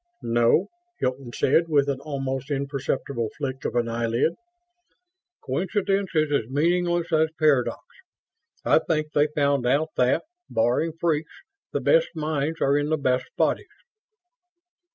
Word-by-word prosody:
"No," 120 +9 +3 0.3
Hilton 130 -1 -2
said, 160 +7 +2
with 145 -2 +3
an 140 -2 -1
almost 135 -2 -4
imperceptible 140 -4 -2
flick 135 -2 -4
of - - -2
an 120 -1 +1
eyelid. 115 +5 0 1.1
"Coincidence 195 +6 0
is 155 -1 +2
as 120 -6 0
meaningless 175 +4 +1
as 160 0 +3
paradox. 145 -6 +2 0.8
I - - +5
think 155 -1 -1
they 145 +1 +4
found 140 -4 +1
out 145 +5 +2
that 125 0 +2 0.3
barring 120 +8 +1
freaks 160 - -1 0.3
the - - -1
best - - +4
minds 155 0 -2
are 140 +1 +3
in 145 +1 -1
the 155 - +2
best 130 -3 0
bodies." - - +1
145 Hz, 135 wpm, -25 LUFS, 130-160 Hz, 1.1 s, I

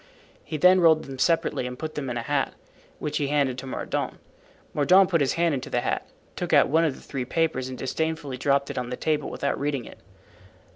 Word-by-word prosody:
He 155 - -4
then 180 +4 +6
rolled 160 -2 +5
them 135 -1 -9
separately 165 -5 +1
and 125 0 -7
put 155 +1 -5
them 140 -3 -4
in 120 - -3
a 115 - -3
hat, 145 +2 -1 0.4
which 150 - -3
he 145 - 0
handed 140 -3 +1
to 135 - -8
Mordaunt. - - -3 0.6
Mordaunt 185 +6 +5
put 165 -3 +3
his 135 - +2
hand 170 -1 +2
into 130 - -4
the - - 0
hat, - - -2 0.3
took - - -3
out - - +6
one 160 +3 +3
of 155 -5 +1
the - - -14
three 135 -3 -4
papers 130 -1 -1
and 130 - -6
disdainfully 155 0 -2
dropped 140 +1 +1
it - - -3
on 125 -1 -4
the 125 - -4
table 150 -2 -1
without 140 - -2
reading 140 -4 -2
it. - - -12
145 Hz, 225 wpm, -25 LUFS, 130-160 Hz, 0.6 s, then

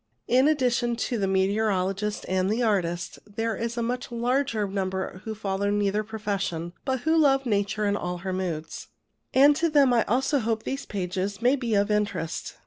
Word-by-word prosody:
In 255 +3 +4
addition 250 -5 +1
to 235 0 -2
the 195 - +1
meteorologist 195 +1 0
and 185 0 +1
the 230 +4 +1
artist, 175 -6 -1
there 225 +2 -2
are 230 - -2
a 235 - 0
much 245 +1 -3
larger 240 -2 0
number 190 -1 -3
who 220 -1 -4
follow 200 -1 -1
neither 205 0 +1
profession, 200 -6 -3
but 260 -2 -1
who 320 +3 +2
love 275 -4 +4
Nature 210 -1 0
in 200 0 +1
all 180 -3 -3
her 190 - -1
moods; 170 -4 -4 0.4
and 285 +2 +6
to 335 +3 +1
them 280 -4 +4
also 250 +5 +2
I - - +1
hope 225 -1 -1
these 275 +1 -4
pages 195 0 -3
may 250 +4 +3
be 240 -5 -1
of 200 +1 +2
interest. 205 -6 -2
210 Hz, 180 wpm, -26 LUFS, 195-245 Hz, 0.4 s, and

